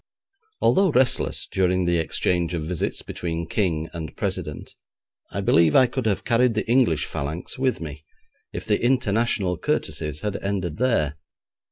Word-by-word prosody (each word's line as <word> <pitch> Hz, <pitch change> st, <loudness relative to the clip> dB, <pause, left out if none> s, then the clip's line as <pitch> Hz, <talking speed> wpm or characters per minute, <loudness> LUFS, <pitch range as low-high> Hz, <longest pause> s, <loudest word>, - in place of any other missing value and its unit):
Although 195 Hz, 0 st, +4 dB
restless 130 Hz, -4 st, +1 dB
during 90 Hz, -1 st, +2 dB
the 85 Hz, -1 st, +2 dB
exchange 85 Hz, +1 st, 0 dB
of 80 Hz, -, -3 dB
visits 85 Hz, +1 st, -3 dB
between 85 Hz, -1 st, -4 dB
King 80 Hz, -5 st, 0 dB
and 80 Hz, -2 st, -7 dB
President, 90 Hz, -7 st, -4 dB, 0.6 s
I 100 Hz, -, -3 dB
believe 85 Hz, -5 st, +4 dB
I 130 Hz, -, +7 dB
could 125 Hz, -1 st, -2 dB
have 100 Hz, -, 0 dB
carried 120 Hz, -1 st, +3 dB
the 110 Hz, -, -1 dB
English 120 Hz, -, +3 dB
phalanx 80 Hz, -, -5 dB
with 130 Hz, -1 st, +1 dB
me, 75 Hz, -2 st, -7 dB, 0.5 s
if -, -, -6 dB
the 105 Hz, 0 st, +1 dB
international 115 Hz, -7 st, +1 dB
courtesies 75 Hz, -, -2 dB
had 105 Hz, -2 st, -2 dB
ended 95 Hz, -5 st, -2 dB
there. 110 Hz, -, +1 dB
90 Hz, 150 wpm, -24 LUFS, 80-115 Hz, 0.6 s, I